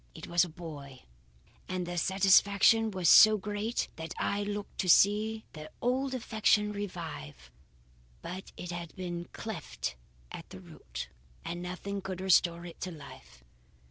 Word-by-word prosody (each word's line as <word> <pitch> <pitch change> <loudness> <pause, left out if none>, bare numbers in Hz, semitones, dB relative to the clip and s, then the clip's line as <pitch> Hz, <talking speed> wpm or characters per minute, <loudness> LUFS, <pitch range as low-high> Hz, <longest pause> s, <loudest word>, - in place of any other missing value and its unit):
It 160 - -8
was 175 +1 +3
a 180 - -4
boy, 150 -6 -10 0.7
and 185 -1 -2
their 175 0 -5
satisfaction 200 +4 +4
was 185 -4 -1
so 215 +6 +9
great 210 +3 -2
that 160 0 -6
I 200 - -1
looked 205 0 -5
to 185 - 0
see 215 +4 +4
their 155 -1 -9
old 260 +2 0
affection 215 -3 +2
revive. 160 - -7 0.7
But 185 +1 -7
it 175 - -6
had 170 -1 -7
been 175 -2 -5
cleft - - -5 0.4
at - - -9
the - - -10
root, 60 0 -9 0.4
and 175 +1 -4
nothing 190 +3 -5
could 185 -1 -5
restore 175 -2 +3
it 170 - -11
to 185 - -3
life. 140 - -13
185 Hz, 145 wpm, -30 LUFS, 170-205 Hz, 0.7 s, so